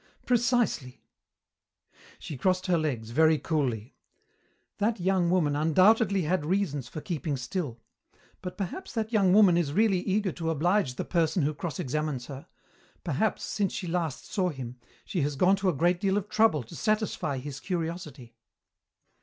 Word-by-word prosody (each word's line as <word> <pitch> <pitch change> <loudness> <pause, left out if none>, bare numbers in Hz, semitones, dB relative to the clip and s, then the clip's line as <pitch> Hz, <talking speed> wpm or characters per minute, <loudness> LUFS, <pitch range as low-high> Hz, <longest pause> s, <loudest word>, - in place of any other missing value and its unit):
"Precisely." 240 - +1 1.1
She 155 - -7
crossed 185 +6 0
her 180 -3 +2
legs, 120 -8 -3
very 160 +4 +4
coolly. 130 -9 -2 0.9
"That 220 +1 +1
young 180 -1 +2
woman 165 -5 +2
undoubtedly 190 +6 +4
had 175 +1 0
reasons 155 -6 -1
for 155 - -7
keeping 150 -2 -3
still. 125 -1 -4 0.6
But 180 -1 -6
perhaps 200 - -5
that 225 0 -2
young 195 -4 +4
woman 190 -3 +6
is 150 -5 0
really 205 -1 +3
eager 195 +1 0
to 165 0 -3
oblige 165 -2 +1
the - - -4
person 165 -1 +1
who 150 +2 +1
cross 150 -2 -5
examines 145 -2 -2
her; 135 -1 -9 0.6
perhaps, 170 +7 0
since 205 -3 -1
she 190 - -4
last 165 -4 -2
saw 185 -3 0
him, 130 -5 -7 0.3
she 180 - -2
has 145 0 -1
gone 185 +7 +4
to 190 -1 +1
a - - +1
great 175 +4 +2
deal 195 0 +2
of 205 0 -3
trouble 215 - +3
to 115 - -12
satisfy 215 -10 -1
his 140 +1 -6
curiosity." 165 - -5
170 Hz, 160 wpm, -28 LUFS, 145-195 Hz, 1.1 s, woman